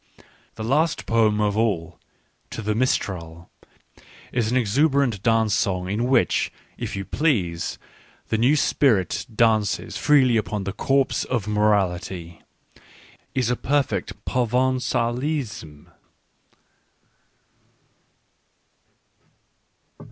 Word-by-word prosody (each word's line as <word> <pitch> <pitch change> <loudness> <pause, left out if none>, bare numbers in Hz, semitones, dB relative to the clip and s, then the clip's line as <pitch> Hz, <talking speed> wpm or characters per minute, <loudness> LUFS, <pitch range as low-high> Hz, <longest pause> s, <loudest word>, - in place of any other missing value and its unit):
The 110 - -6
last 150 +8 +1
poem 110 -2 +2
of 105 -1 +1
all 90 -7 -1 0.3
," - - -43
To 115 - -6
the 105 +1 0
Mistral," 90 -8 -2 0.4
— - - -23
an 120 0 +1
exuberant 130 -1 +2
dance 115 -2 +2
song 90 -2 0
in 110 +4 0
which, 130 +1 +2 0.2
if - - -5
you 100 0 -4
please, 95 - -1 0.5
the 110 - +1
new 130 +6 +4
spirit 115 -10 +1
dances 110 -3 +1
freely 130 -5 +4
upon 105 -2 -2
the 100 0 -4
corpse 135 0 +1
of 120 -5 -2
morality, 95 -5 0 0.5
— - - -26
is 125 -2 +1
a - - +1
perfect 130 -9 -2
Provengalism. 125 - -1
110 Hz, 100 wpm, -23 LUFS, 100-130 Hz, 0.5 s, new